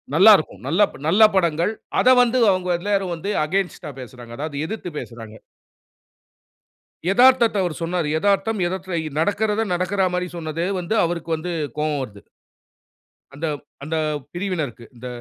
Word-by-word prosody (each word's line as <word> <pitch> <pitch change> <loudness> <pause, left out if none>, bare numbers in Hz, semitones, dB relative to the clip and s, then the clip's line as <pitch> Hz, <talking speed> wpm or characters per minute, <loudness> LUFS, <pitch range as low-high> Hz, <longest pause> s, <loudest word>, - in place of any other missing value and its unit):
நல்லா 210 +5 +9
இருக்கும், 100 -10 -7
நல்ல 175 +8 +1 0.3
நல்ல 200 +7 +5
படங்கள். 170 +3 +1 0.3
அத - - 0
வந்து 245 +1 +2
அவங்க 185 -1 -1
எல்லாரும் 195 -2 -1
வந்து 195 +5 -4
அகைன்ஸ்ட் 190 +3 -2
டா 150 - -5
பேசுறாங்க, 120 -1 -11
அதாவது 150 0 -4
எதிர்த்து 215 -4 -5
பேசுறாங்க. 115 -2 -9 1.8
எதார்த்தத்த 245 -1 +5
அவர் 175 -4 -2
சொன்னாரு. 170 -2 -1
எதார்த்தம் 205 +3 +1
எதார்த்தம் 170 -5 -4
நடக்குறத 210 +5 +1
நடக்கற 185 +2 +1
மாரி 180 0 -1
சொன்னது 160 0 -3 0.2
வந்து, 180 +6 -2
அவருக்கு 170 -1 -4
வந்து 175 +3 -5 0.3
கோவம் 150 -1 0
வருது. 105 -5 -10 1.1
அந்த 145 +4 -4 0.4
அந்த 155 +3 -3 0.4
பிரிவினருக்கு, 170 - -3
இந்த 125 +2 -8
175 Hz, 135 wpm, -22 LUFS, 155-200 Hz, 1.8 s, நல்லா